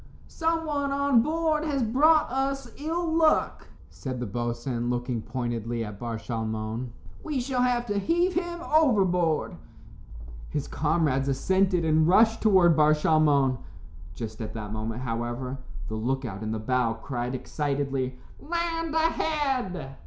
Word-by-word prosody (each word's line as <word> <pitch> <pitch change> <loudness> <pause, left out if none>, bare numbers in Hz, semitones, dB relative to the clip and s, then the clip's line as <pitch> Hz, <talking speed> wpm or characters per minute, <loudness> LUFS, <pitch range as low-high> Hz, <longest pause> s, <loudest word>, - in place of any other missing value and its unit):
"Someone 320 -4 -1
on 280 -3 +3
board 310 +2 0
has 285 -5 0
brought 300 +8 +4
us 270 -1 -2
ill 325 +4 -2
luck," 320 -1 +2 0.2
said 130 -2 -5
the 125 - -2
boatswain, 120 +2 -3
looking 120 -1 -2
pointedly 115 0 -3
at 105 -1 -8
Bar 115 -2 -3
Shalmon; 110 +1 -4 0.3
"we 300 -4 -2
shall 250 0 -1
have 245 -1 +1
to 205 -3 -1
heave 345 - +1
him 345 -1 -2
overboard." 190 - +3 0.9
His 145 -2 -3
comrades 150 -4 +1
assented 180 +5 +2
and 155 0 +3
rushed 220 +5 +4
toward 185 -6 +5
Bar 155 0 +5
Shalmon. 145 -4 +3 0.6
Just 110 +1 -6
at 110 - -6
that 105 -1 -5
moment, 110 +2 -4
however, 120 +2 -3 0.3
the - - -5
look 130 +5 -1
out 100 -3 -6
in 110 0 -3
the 110 - -1
bow 115 +1 0
cried 125 +1 -4
excitedly, 135 -2 -2 0.2
"Land 330 0 -2
ahead!" 275 - 0
155 Hz, 140 wpm, -27 LUFS, -, 0.9 s, toward